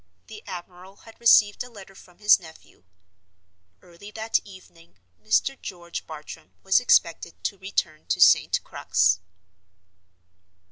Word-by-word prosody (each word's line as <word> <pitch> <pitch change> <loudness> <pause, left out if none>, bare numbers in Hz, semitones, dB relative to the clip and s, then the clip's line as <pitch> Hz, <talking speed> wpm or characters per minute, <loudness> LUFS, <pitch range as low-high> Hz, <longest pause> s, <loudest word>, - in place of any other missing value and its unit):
The 215 -1 -12
admiral 180 +1 -10
had 225 - -16
received 215 -3 +4
a 250 - -13
letter 195 -4 -14
from 180 -2 -18
his 210 +1 +5
nephew. 160 - -17 1.0
Early 175 +4 -14
that 220 +1 -1
evening 185 - -17 0.3
Mr. 265 +5 0
George 170 -2 -8
Bartram 155 -1 -11
was 195 +3 +4
expected 170 -8 +1
to 200 - -3
return 175 -5 -3
to - - -1
St. - - +4
Crux. 90 0 +1
190 Hz, 125 wpm, -24 LUFS, 170-210 Hz, 1.0 s, his